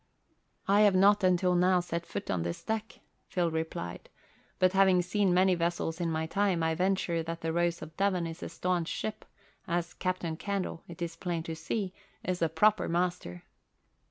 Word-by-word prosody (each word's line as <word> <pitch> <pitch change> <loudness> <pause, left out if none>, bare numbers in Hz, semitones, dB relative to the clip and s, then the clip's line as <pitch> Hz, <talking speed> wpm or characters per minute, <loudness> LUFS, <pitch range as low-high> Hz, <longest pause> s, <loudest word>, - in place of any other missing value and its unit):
"I 200 +2 +5
have 205 -3 +5
not 200 +2 +5
until 180 0 +3
now 180 +1 +4
set 170 -1 -4
foot - - -4
on 90 - 0
this 85 0 -4
deck," 220 0 -4 0.3
Phil 175 -2 0
replied. 160 - -4 0.5
"But 185 0 +3
having 190 -2 +5
seen 195 +1 +1
many 185 +1 +4
vessels 170 -1 -1
in 170 - 0
my 160 0 -1
time, 190 -1 +1
I 160 0 +2
venture 180 -1 0
that 165 +1 -5
the 165 0 -2
Rose 170 0 0
of 155 - -11
Devon 195 -3 +1
is 165 +1 -6
a - - -5
staunch 180 -2 -1
ship, 215 0 -4 0.4
as 175 -1 -1
Captain 180 -3 -2
Candle, 195 -3 -3
it 170 0 -6
is 165 -1 -4
plain 170 -1 -3
to 165 -1 -5
see, 185 +4 -3 0.3
is 180 -1 -2
a 165 - +3
proper 210 +6 +3
master." 170 - -2
175 Hz, 185 wpm, -30 LUFS, 165-190 Hz, 0.5 s, I